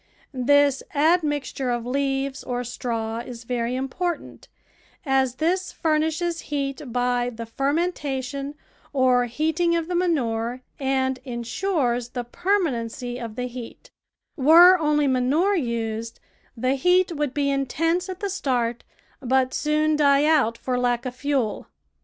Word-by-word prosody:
This 280 +1 +3
admixture 295 -4 +1
of 240 -1 -1
leaves 270 +1 -1
or 245 0 -3
straw 230 -2 -3
is 235 0 -8
very 235 0 -2
imj)ortant, 270 +7 -4 0.6
as 265 -2 +2
this 360 +7 0
furnishes 320 +2 0
heat 275 -2 -3
by 245 0 +1
the 230 0 -7
fermentation 280 0 -2 0.4
or 255 -2 +3
heating 320 +7 0
of 335 -1 -1
the 360 - -3
manure 250 -9 0 0.2
and 265 -1 0
in 240 -3 -5
sures 245 -6 -1
the 245 -2 -3
permanency 250 - -1
of 230 -3 -6
the 250 - -3
heat; 245 -1 -9 0.4
were 335 +6 +8
only 300 -2 +2
manure 275 +10 +2
used, 230 - -3 0.4
the 255 +3 +1
heat 360 +6 +3
would 295 -3 -2
be 280 -1 +1
intense 330 +7 0
at 375 +1 -6
the 405 - -1
start, 245 -9 -1 0.4
but 260 0 +1
soon 305 0 +1
die 285 -1 +4
out 285 -8 +3
for 250 -1 -2
lack 245 0 0
of 250 -1 -4
fuel. 270 -5 -1
270 Hz, 135 wpm, -24 LUFS, 245-310 Hz, 0.6 s, were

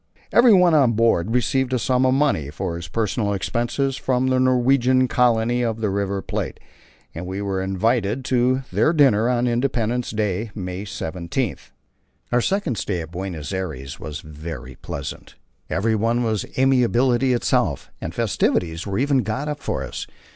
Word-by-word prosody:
Everyone 195 -8 +6
on 135 -6 +4
board 110 -5 +2
received 130 +2 +1
a - - +3
sum 130 +1 +2
of 130 - +3
money 135 - +1
for 85 +4 -4
his 85 +1 -6
personal 105 -1 -1
expenses 120 +7 -1
from 130 -1 0
the 130 0 +2
Norwegian 130 0 +3
colony 120 -1 +2
of 115 -2 -1
the 105 -3 0
River 100 0 -2
Plate, - - -4 0.5
and 85 +2 -6
we 95 +2 -4
were 100 -2 -2
invited 110 +5 0
to 130 0 +2
their 160 - +3
dinner 125 -7 +4
on 125 -1 +1
Independence 120 -1 0
Day, 105 0 -1
May 90 0 -5
17. 90 +5 -3 0.8
Our 120 0 +3
second 190 - -1
stay 95 -2 -2
at 80 0 -9
Buenos 90 -2 -5
Aires 80 -8 -5
was 75 0 -6
very 75 -2 -8
pleasant; 70 - -7 0.3
everyone 115 +4 +1
was 110 -3 -1
amiability 130 0 +3
itself, 120 - 0
and - - -4
festivities 85 +2 0
were 100 0 -2
even 140 +1 +2
got 130 +5 -2
up 150 -1 -3
for - - -3
us. - - -6
115 Hz, 155 wpm, -22 LUFS, 95-130 Hz, 0.8 s, Everyone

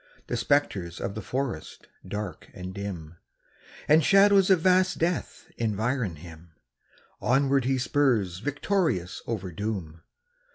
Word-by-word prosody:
The - - -3
spectres 95 -12 0
of - - -3
the 110 - -5
forest, 125 - -4 0.2
dark 105 0 -6
and 95 -1 -7
dim, 90 -5 -6 0.7
And 155 +2 +5
shadows 195 +2 +5
of 185 -4 +5
vast 185 +1 +3
death 170 +1 -2
environ 110 -2 -1
him 80 +1 -13 0.7
Onward 135 0 +2
he 135 0 +1
spurs 120 -9 +1
victorious 145 - -1
over 100 -6 -3
doom. 90 -5 -4
110 Hz, 120 wpm, -27 LUFS, 90-145 Hz, 0.7 s, And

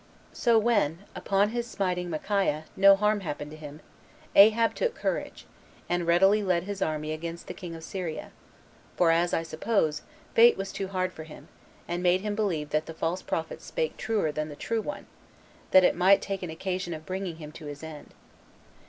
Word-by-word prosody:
So 235 -2 +3
when, 205 -7 +1
upon 200 +1 +1
his 235 +1 -3
smiting 180 -5 -2
Micaiah, 165 -2 0
no 195 +1 +7
harm 210 +1 +1
happened 150 -5 -5
to - - -9
him, 150 0 -10 0.5
Ahab 220 +3 +6
took 480 -1 -1
courage, - - -3 0.4
and 175 -1 -1
readily 195 +5 +5
led 180 -4 +1
his 200 0 -6
army 155 -2 -1
against 165 +2 -5
the - - -6
king 175 -3 -8
of 165 - -10
Syria; 175 -3 -5 0.7
for, 170 -2 +4
as 170 +1 +2
I 165 - 0
suppose, 160 -1 0 0.3
fate 235 +1 +7
was 195 0 -4
too 195 - -4
hard 185 -1 -2
for 160 - -9
him, 155 - -13 0.4
and 175 +1 -2
made 180 +1 +3
him 210 0 -2
believe 175 -9 -1
that 155 +1 0
the 165 - -8
false 170 +3 -2
prophets 160 0 -4
spake - - -2
truer 215 -8 -1
than 155 +1 -3
the 145 - -8
true 225 +9 -2
one, 295 - -6 0.6
that 185 - +7
it - - +4
might 185 +3 +5
take 195 -1 -3
an 180 - -5
occasion 180 +1 -3
of 155 0 -10
bringing 185 -2 -4
him 155 -2 -9
to 155 -1 -10
his 145 +1 -8
end. 155 -2 -10
180 Hz, 190 wpm, -27 LUFS, 160-200 Hz, 0.7 s, no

